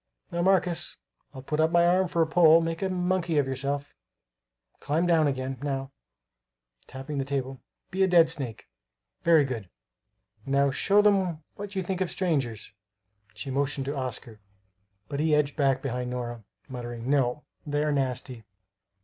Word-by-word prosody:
Now, 170 - -1
Marcus, 180 -2 +1 0.3
I'll 130 -2 -10
put 150 +3 -2
up 160 0 +4
my 170 0 +4
arm 185 +2 +3
for 170 -1 +2
a - - 0
pole; 160 0 +6
make 165 0 -3
a 190 - 0
monkey 180 -2 0
of 145 - +3
yourself. 140 +2 -3 0.9
Climb 160 +4 0
down, 165 -3 +4
again. 130 -2 -3
Now," 135 -1 -3 1.0
tapping 135 +2 -6
the - - 0
table, 135 -2 -3 0.3
"be 190 - -2
a 190 - +5
dead 170 -3 +6
snake. 135 -9 -4 0.5
Very 165 -4 +5
good. 115 -8 -5 0.7
Now, 140 +1 +2
show 205 +9 +3
them 190 -6 +2
what 205 0 -8
you 190 - -1
think 185 +1 -3
of 185 - 0
strangers." 135 - -2 0.6
She 135 - -5
motioned 140 0 -1
to 140 +2 -3
Oscar; 125 -4 -5 0.7
but 140 -1 -4
he 155 0 +3
edged 145 -1 +1
back 135 -2 +1
behind 125 -2 -3
Nora, 120 -2 -5 0.2
muttering, 120 -2 -6
"No, 135 0 +1 0.2
they 145 0 0
are 150 - +1
nasty!" 130 -3 -2
145 Hz, 160 wpm, -27 LUFS, 130-170 Hz, 1.0 s, pole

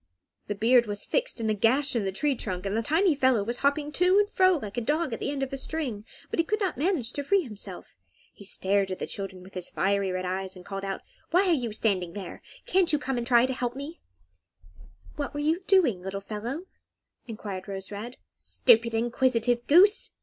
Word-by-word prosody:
The 205 - -2
beard 235 +3 +4
was 205 0 -4
fixed - - -1
in 225 - -1
a 215 - +2
gash 255 +7 +2
in 220 -4 0
the 190 - -1
tree 285 +9 0
trunk, 185 -6 -4
and 195 +1 -1
the 225 - +1
tiny 325 - +3
fellow 260 -6 +2
was 235 +4 -2
hopping 290 +1 0
to 360 +5 +3
and 415 0 +4
fro, 370 -3 +3
like 210 -8 -7
a 240 - -1
dog 300 +3 0
at - - -4
the - - -2
end 280 -1 -2
of 270 - -4
a - - -2
string, 265 -8 -3 0.3
but - - -2
he - - +5
could 425 +5 -1
not 390 -3 -1
manage 285 - 0
to 285 - -3
free 390 +6 +2
himself. 205 - -8 0.4
He - - -14
stared 195 0 0
at 185 - -3
the - - -3
children, 190 -2 -6
with 190 - -15
his 180 -1 -3
red, - - -14
fiery 195 0 +1
eyes, 190 +1 -2
and 180 -1 -12
called 195 -1 -5
out, 195 -1 -3 0.3
"Why 370 +3 +3
are - - +5
you 245 -7 -1
standing 195 -5 0
there? 190 -3 -7 0.2
Can't 370 -2 +3
you 300 - +3
come 265 -2 -2
and 235 - -4
try 240 -1 +5
to 260 - -2
help 245 -1 -3
me?" 285 +5 -7 1.2
"What 290 -1 -4
were - - -2
you 315 +5 +1
doing, 315 - +3
little 190 +1 -4
fellow?" 225 - -5 0.6
enquired 205 -4 -6
Rose 195 -1 -6
Red. 220 +5 -7 0.2
"Stupid, 230 -2 +3
inquisitive 240 0 +1
goose!" 385 +7 +5
240 Hz, 220 wpm, -27 LUFS, 200-295 Hz, 1.2 s, he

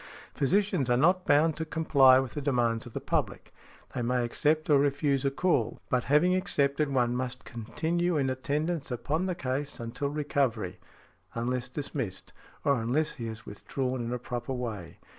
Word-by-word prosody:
Physicians 180 -2 +1
are 120 - +4
not 180 +6 +3
bound 150 +2 +4
to 160 - -2
comply 140 -5 +5
with 130 -1 -1
the 145 - -4
demands 120 -5 0
of 115 - -12
the - - -3
public; - - -2 0.4
they - - -2
may 125 0 +1
accept 155 +6 +1
or 145 -2 +5
refuse 140 -1 +1
a - - +4
call: 135 -5 0
but 125 -1 +1
having 150 +6 +4
accepted, 145 -5 +1
one 125 -2 +1
must 125 0 -4
continue 165 +9 -1
in 135 -2 +1
attendance 145 +4 -2
upon 150 +9 -1
the 180 - -1
case 140 -2 -3
until 120 +5 -3
recovery, 140 -10 -1 0.6
unless 125 +2 -2
dismissed, 130 -8 -5 0.3
or 140 -4 +3
unless 135 +8 +1
he 115 - -6
has 110 0 -8
withdrawn 125 +4 -3
in 115 - -4
a 125 - -1
proper 120 +1 -4
way. 110 -9 -5
135 Hz, 170 wpm, -29 LUFS, 120-150 Hz, 0.6 s, comply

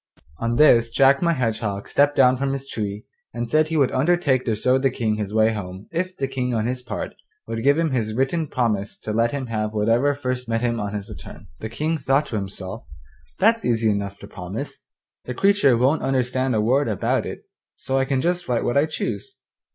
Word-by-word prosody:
On 115 0 -1
this 120 -5 +5
Jack 135 +3 +4
my 170 -1 +3
Hedgehog 110 -6 -2
stepped 145 +1 +3
down 130 -1 +5
from 135 +1 -1
his 135 0 -4
tree 105 -2 -4 0.3
and 120 - -2
said 155 +5 +3
he 160 0 -1
would 140 -4 +3
undertake 140 -2 +2
to 115 - 0
show 125 +5 +2
the 135 0 +2
King 110 -4 -1
his 105 -2 -3
way 110 +1 +3
home 95 -1 -7
if 185 +2 -3
the 135 - -1
King 125 -2 -2
on 110 -1 0
his 125 +1 -2
part 125 - -5 0.3
would 115 0 -4
give 140 +4 +4
him 165 -2 +1
his 110 -4 -1
written 135 +6 0
promise 110 -7 -1
to 105 - -5
let 115 +2 +2
him 140 -2 -3
have 110 -2 -2
whatever 115 +7 +2
first 125 -3 -3
met 115 0 0
him 120 -1 0
on 105 0 -3
his 100 -1 -5
return. - - -11
The 110 - -5
King 155 +7 -2
thought 135 +2 +2
to - - -6
himself, 95 -4 -5 0.5
'That's 225 +3 +3
easy 115 -2 +2
enough 100 -1 -3
to - - -9
promise. - - -7 0.5
The 125 - -5
creature 195 -10 +4
won't 135 +6 +2
understand 130 -1 0
a 105 - +2
word 130 +6 +2
about 105 -4 0
it, - - -7 0.3
so 135 0 -1
I 135 - +1
can 135 -1 0
just 175 +2 -1
write 120 -2 0
what 120 - 0
I 145 +3 +3
choose. 115 -9 -4
125 Hz, 215 wpm, -23 LUFS, 110-140 Hz, 0.5 s, this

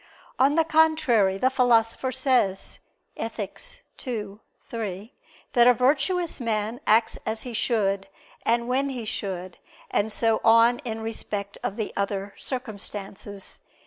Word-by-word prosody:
On 275 +3 +4
the 325 - +5
contrary, 310 -11 +3
the 260 +6 +2
Philosopher 245 -1 +3
says 255 -8 +1 0.4
(Ethic. 225 - -5 0.2
ii, 210 -4 -4 0.2
3) 215 0 -5 0.4
that 240 -1 +6
a 250 - +7
virtuous 290 +8 +1
man 220 0 -1
acts 225 +2 +4
as 220 0 -3
he 245 - -6
should, 200 -4 0 0.4
and 235 +1 +2
when 270 +3 +1
he 250 -4 -4
should, 185 -4 -4 0.3
and 220 +2 +1
so 225 +1 +2
on 230 +2 +6
in 225 -6 -4
respect 205 -2 -4
of 200 - -3
the 220 -2 -3
other 200 0 -2
circumstances. 205 -5 -6
225 Hz, 130 wpm, -25 LUFS, 205-255 Hz, 0.4 s, a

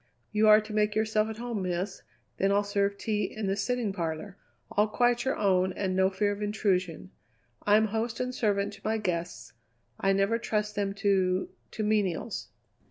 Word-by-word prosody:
"You 215 +1 +3
are 215 0 +9
to 215 0 -7
make 210 0 +1
yourself 220 0 +1
at 220 - -6
home, 235 -3 -3
Miss; 185 +2 -3 0.4
then 195 +1 +2
I'll 200 +1 +3
serve 200 0 0
tea 210 -1 -1
in 215 -1 -5
the 195 0 0
sitting 225 0 -1
parlour; 170 +1 -4 0.4
all 210 +1 +3
quite 240 +2 +1
your 265 - 0
own 190 -2 +2
and 190 -1 -2
no 190 0 +4
fear 205 +2 0
of 205 +1 -5
intrusion. 185 - -1 0.6
I'm 210 +1 +5
host 225 +2 -2
and 250 0 -2
servant 205 -3 0
to 200 - -13
my 220 +1 0
guests. 175 -5 -3 0.5
I 195 0 +2
never 195 +4 +2
trust 210 -2 -1
them 200 -1 -2
to 190 -2 +1 0.2
to 215 - -4
menials." 210 0 -1
205 Hz, 180 wpm, -28 LUFS, 195-215 Hz, 0.6 s, are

